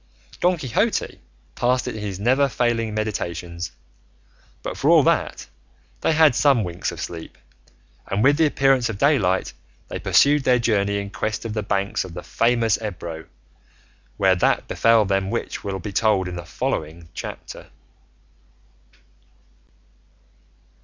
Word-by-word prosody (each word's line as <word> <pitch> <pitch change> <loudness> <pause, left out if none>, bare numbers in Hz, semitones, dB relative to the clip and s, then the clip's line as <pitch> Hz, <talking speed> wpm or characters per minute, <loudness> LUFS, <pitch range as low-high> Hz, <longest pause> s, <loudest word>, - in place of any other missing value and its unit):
Don 180 0 +2
Quixote 130 -7 -1 0.3
passed 125 +1 0
it 125 - -3
in 110 - -6
his 100 -2 -5
never 130 +6 +3
failing 115 -2 0
meditations; 85 -5 -4 0.9
but, - - -4
for - - 0
all - - +7
that, - - 0 0.5
they - - +1
had 155 -3 +5
some 135 -3 +3
winks 90 -1 -3
of - - -9
sleep, 85 -2 -7 0.7
and 100 +3 0
with 145 +2 +5
the 160 -1 +4
appearance 135 -4 +2
of 110 - -4
daylight 100 -9 +2 0.4
they - - -4
pursued 145 0 +4
their 125 -1 +4
journey 100 -4 +1
in 100 0 -5
quest 110 +2 -3
of 110 - -4
the 105 - -1
banks 100 -1 -1
of 90 -3 -10
the 90 - -6
famous 115 -2 +1
Ebro, 85 -6 -6 0.9
where 95 -1 +4
that 90 - +1
befell 115 -2 +3
them 95 0 0
which - - -4
will 100 -1 -3
be 100 +2 -7
told 100 -3 +2
in 90 - -5
the 85 0 -7
following 80 0 -4
chapter. - - -8
110 Hz, 145 wpm, -22 LUFS, 95-125 Hz, 0.9 s, all